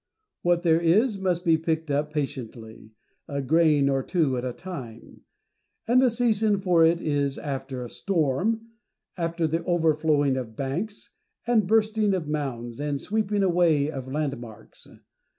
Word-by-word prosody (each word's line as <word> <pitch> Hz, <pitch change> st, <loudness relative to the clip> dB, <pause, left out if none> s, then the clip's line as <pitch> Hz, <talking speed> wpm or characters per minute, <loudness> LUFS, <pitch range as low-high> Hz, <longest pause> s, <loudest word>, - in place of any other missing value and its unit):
What 175 Hz, 0 st, +2 dB
there 165 Hz, -1 st, +3 dB
is 200 Hz, +6 st, +3 dB
must 180 Hz, -1 st, -1 dB
be 165 Hz, -1 st, +4 dB
picked 160 Hz, -1 st, -2 dB
up 145 Hz, +2 st, 0 dB
patiently, 115 Hz, -7 st, -6 dB, 0.4 s
a 140 Hz, -1 st, -3 dB
grain 150 Hz, 0 st, +3 dB
or 135 Hz, -1 st, +1 dB
two 150 Hz, -3 st, 0 dB
at 125 Hz, -, -3 dB
a 130 Hz, -, -2 dB
time; 125 Hz, -8 st, -9 dB, 0.7 s
and 245 Hz, +2 st, +5 dB
the 260 Hz, -, +5 dB
season 220 Hz, -3 st, +1 dB
for 180 Hz, -4 st, +3 dB
it 165 Hz, +1 st, +4 dB
is 145 Hz, -4 st, -1 dB
after 135 Hz, -3 st, -5 dB
a -, -, -8 dB
storm, 195 Hz, -, 0 dB, 0.5 s
after 170 Hz, -1 st, -1 dB
the 165 Hz, +2 st, -1 dB
overflowing 155 Hz, -5 st, +2 dB
of 115 Hz, -4 st, -6 dB
banks, 170 Hz, -, -4 dB, 0.3 s
and 225 Hz, -5 st, +2 dB
bursting 215 Hz, -1 st, +2 dB
of 170 Hz, -5 st, -4 dB
mounds, 130 Hz, -5 st, -4 dB
and 145 Hz, -1 st, -2 dB
sweeping 210 Hz, +2 st, -1 dB
away 170 Hz, -5 st, +2 dB
of 130 Hz, -3 st, -7 dB
landmarks. 120 Hz, -7 st, -6 dB
160 Hz, 150 wpm, -25 LUFS, 135-185 Hz, 0.7 s, and